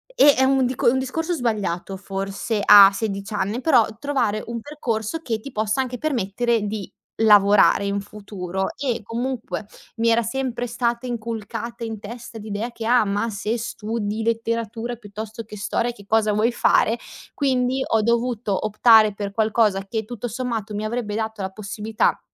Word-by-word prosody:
e 290 - +7
un 265 -1 +3
dico 245 -1 +2
un 260 - +1
discorso 325 +7 -2
sbagliato 205 - -2
forse 195 +3 -3
a 200 -1 +9
16 200 0 -4
anni, 210 +4 -1
però 265 -6 +5 0.2
trovare 270 -7 0
un 235 0 -5
percorso 255 0 -3
che 225 -6 -2
ti 275 +6 -9
possa 215 +3 0
anche 250 -1 -4
permettere 235 -4 0
di 205 -1 -5 0.3
lavorare 205 -1 +6
in 200 0 -1
futuro 190 -2 -5
e 260 -4 -2
comunque 235 +1 -4 0.3
mi 230 +1 +2
era 230 +1 +4
sempre 245 +1 -3
stata 235 +1 -1
inculcata 230 0 -5
in 225 -2 -5
testa 230 +2 -9
l'idea 215 +2 -4
che: 230 -1 -7
"Ah, 240 -1 +4
ma 205 +3 -1
se 210 +3 -2
studi 220 -1 -3
letteratura 230 +1 -2
piuttosto 215 +1 -8
che 210 0 -10
storia 230 +4 -1
che 205 -4 -15
cosa 215 0 +2
vuoi 215 +3 +2
fare", 235 -1 +2 0.3
quindi 260 -2 +1
ho 220 -1 +1
dovuto 235 -3 0
optare 215 -1 +5
per 200 -1 -4
qualcosa 215 -2 +1
che 220 +1 -3
tutto 240 +1 -5
sommato 225 -3 -4
mi 210 +1 -3
avrebbe 215 -2 -3
dato 220 -1 -3
la 190 - -2
possibilità 215 +2 -1
225 Hz, 160 wpm, -22 LUFS, 205-240 Hz, 0.3 s, a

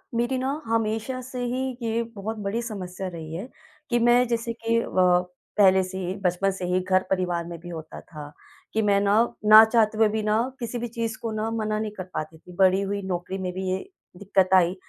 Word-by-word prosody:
मेरी 240 +3 0
ना, 270 +4 -2
हमेशा 225 +2 -1
से 255 0 -7
ही 255 +1 -2
ये 230 0 0
बहुत 220 +3 -4
बड़ी 205 +4 -1
समस्या 190 -5 -5
रही 165 -3 -7
है 195 +8 -5 0.4
कि 240 - +2
मैं 240 +1 +4
जैसे 230 0 -1
कि 230 0 0
अ, - - -4 0.7
पहले 190 -2 +6
से 185 +1 -6
ही, 185 0 -3
बचपन 180 +2 +1
से 190 -1 -5
ही 180 +1 +1
घर 185 0 +2
परिवार 180 -3 0
में 170 0 -7
भी 175 +2 -10
होता 160 -2 -8
था 150 -2 -10 0.4
कि 220 - +2
मैं 200 -2 +3
ना, 200 +1 +3 0.3
ना 215 +1 +10
चाहते 220 -1 +2
हुए 220 0 +5
भी 220 +1 -1
ना, 215 +1 +2 0.2
किसी 235 0 -4
भी 240 - -3
चीज़ 230 -1 -3
को 230 - -3
ना 215 +1 -2
मना 215 -1 -1
नहीं 215 -1 -3
कर 185 - -4
पाती 155 +1 -5
थी। 180 +2 -15
बड़ी 190 0 +4
हुई, 200 +1 -2
नौकरी 185 0 -3
में 185 -1 -3
भी 190 0 -3
ये 185 - +1 0.4
दिक्कत 190 -1 +1
आई, 180 -1 +5
205 Hz, 220 wpm, -25 LUFS, 185-230 Hz, 0.7 s, ना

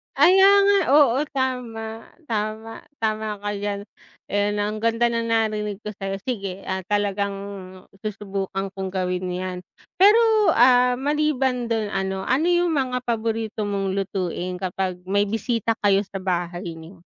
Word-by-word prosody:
Kaya 385 +2 +6 0.2
nga, 405 0 +5 0.2
oo 275 -4 +6 0.2
tama, 230 -4 -3 0.2
tama. 220 +1 -4 0.2
Tama 215 -1 -2
ka 205 - -3
diyan. 200 0 -3 0.5
Ayun, 205 +1 +1
ang 210 +1 -2
ganda 230 +2 +1
na 230 0 -1
narinig 215 -2 -1
ko 210 - -6
sa'yo. 195 -1 -5
Sige, 195 -6 -4
ah, 190 -1 -3
talagang 200 -1 0 0.6
susubukan 195 -2 -4
kong 190 0 -4
gawin 180 -1 -1
'yan. 185 0 -4 0.4
Pero, 430 +2 +5
ah, 250 +1 +5
maliban 270 -2 0
dun 225 -2 -1
ano 190 -1 -2
ano 280 +6 +2
yung 350 0 +3
mga 250 -2 -1
paborito 225 -2 -2
mong 195 -1 -1
lutuin 185 -2 -2
kapag 185 -1 -3
may 200 +1 +3
bisita 225 +2 -1
kayo 200 0 +3
sa 195 0 -7
bahay 175 -2 -3
niyo? 165 +2 -13
210 Hz, 140 wpm, -23 LUFS, 195-240 Hz, 0.6 s, Kaya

